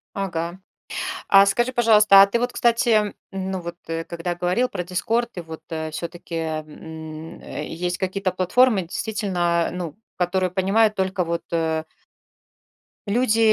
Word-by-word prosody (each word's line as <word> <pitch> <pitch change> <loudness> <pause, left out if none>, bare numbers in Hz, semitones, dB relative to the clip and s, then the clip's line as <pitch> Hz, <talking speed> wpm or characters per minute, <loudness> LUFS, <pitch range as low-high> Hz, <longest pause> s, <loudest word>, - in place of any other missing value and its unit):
Ага. 175 -2 -3 0.7
А 195 0 +8
скажи, 240 +6 +1
пожалуйста, 215 -5 +7
а - - +7
ты 200 +4 0
вот, 245 +1 -1
кстати, 230 -3 +2 0.2
ну, 190 -1 -3
вот, 170 0 -7 0.3
когда 170 +1 -3
говорил 180 +8 +1
про 180 - -4
"Дискорд", 225 +7 -1
и - - -3
вот, 160 -1 -9
э, 160 -1 -3
всё-таки, 170 +2 -7
м, 160 0 -6
э, - - -6
есть 175 +2 -3
какие-то 190 0 -1
платформы 195 +4 +3
действительно, 175 -2 -1
ну, 175 -4 -5 0.2
которые 185 +1 0
понимают 200 +4 +3
только 190 -1 0
вот, 170 0 -2
э 160 -1 0 1.2
люди, 225 +1 +2
185 Hz, 135 wpm, -23 LUFS, 170-210 Hz, 1.2 s, А